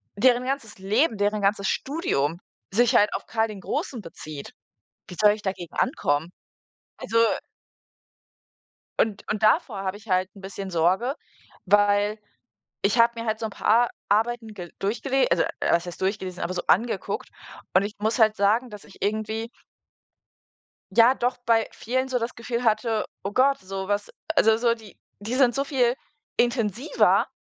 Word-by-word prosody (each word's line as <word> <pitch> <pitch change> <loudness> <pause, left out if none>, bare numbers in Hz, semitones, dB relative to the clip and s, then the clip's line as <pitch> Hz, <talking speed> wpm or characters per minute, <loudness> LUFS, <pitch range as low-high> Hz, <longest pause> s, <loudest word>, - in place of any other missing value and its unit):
deren 245 +3 +3
ganzes 265 -5 -3
Leben, 215 +5 +1
deren 205 +1 0
ganzes 200 0 +1
Studium 175 - -1 0.3
sich 240 +2 +3
halt 210 -2 +5
auf - - -5
Karl 225 -1 +1
den 205 -2 -8
Großen 235 +4 -3
bezieht, 155 -4 -9 0.5
wie 180 - -9
soll 210 -1 +6
ich 210 - -8
dagegen 185 -3 -4
ankommen? 160 - 0 0.7
Also 230 - -4 1.8
und 210 -2 +1
und 215 0 -2
davor 215 - +3
habe 190 +1 -3
ich 215 0 -17
halt 185 +1 +2
'n 195 - -13
bisschen 195 0 -6
Sorge, 185 - +1 0.5
weil, 205 +2 +3 0.6
ich 210 +4 +2
habe 230 0 +4
mir 230 - -5
halt 220 0 0
so 225 - -3
'n - - -6
paar - - -8
Ar 235 +3 +5 0.2
Arbeiten 225 +1 0
gel 175 -3 -9
durchgele 260 +7 +1
also 170 0 +3 0.2
was 170 +1 +2
heißt 175 - -8
durchgelesen, 190 -2 -2
aber 180 +2 -2
so 175 - -2
angeguckt. 230 +5 0 0.5
Und 185 - +5
ich 210 - -5
muss 220 +4 0
halt 220 -1 +4
sagen, 220 +5 +2
dass 210 -1 -10
ich 200 - -17
irgendwie 220 +2 -2 1.4
ja, 240 +3 +6
doch, 245 +1 -1
bei 225 -1 +3
vielen 260 +3 -2
so 250 - 0
das 230 +1 -4
Gefühl 235 +1 -3
hatte, 220 0 +1 0.2
oh 195 - -3
Gott, 275 +4 +3
so 190 0 -6
was 205 0 -1 0.3
also 220 0 +5
so 235 0 +2
die 220 -3 -15 0.2
die 220 +5 -4
sind 255 -3 +4
so 275 - +1
viel 255 -4 +1 0.4
intensiver, 240 - +2
215 Hz, 165 wpm, -25 LUFS, 195-240 Hz, 1.8 s, soll